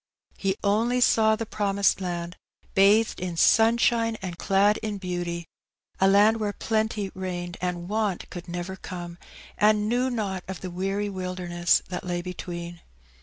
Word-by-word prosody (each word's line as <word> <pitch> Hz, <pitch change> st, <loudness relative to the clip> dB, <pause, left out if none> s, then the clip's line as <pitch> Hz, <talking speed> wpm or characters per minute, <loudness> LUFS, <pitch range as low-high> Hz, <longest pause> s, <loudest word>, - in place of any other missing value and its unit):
He 195 Hz, -1 st, -1 dB
only 225 Hz, +5 st, +2 dB
saw 220 Hz, -3 st, +4 dB
the 225 Hz, -, -4 dB
promised 200 Hz, -2 st, +1 dB
land, 175 Hz, -1 st, -4 dB, 0.4 s
bathed 205 Hz, +3 st, +4 dB
in 175 Hz, -2 st, -4 dB
sunshine 230 Hz, +2 st, +4 dB
and 180 Hz, -2 st, -5 dB
clad 200 Hz, +4 st, +3 dB
in 215 Hz, -2 st, -3 dB
beauty, 175 Hz, -2 st, -4 dB, 0.5 s
a 190 Hz, -, +5 dB
land 205 Hz, +3 st, +5 dB
where 210 Hz, -1 st, -1 dB
plenty 215 Hz, -3 st, -1 dB
reigned 175 Hz, -2 st, -5 dB
and 175 Hz, -1 st, -3 dB
want 210 Hz, -2 st, -1 dB
could 175 Hz, 0 st, -8 dB
never 175 Hz, +2 st, -5 dB
come, 175 Hz, -2 st, -8 dB, 0.4 s
and 210 Hz, 0 st, +4 dB
knew 245 Hz, +3 st, +1 dB
not 200 Hz, -6 st, -3 dB
of 190 Hz, -3 st, -6 dB
the 185 Hz, -, -5 dB
weary 195 Hz, +3 st, -2 dB
wilderness 180 Hz, -3 st, 0 dB
that 180 Hz, -, -4 dB
lay 175 Hz, -1 st, -3 dB
between. 175 Hz, -1 st, -6 dB
190 Hz, 150 wpm, -26 LUFS, 175-215 Hz, 0.5 s, a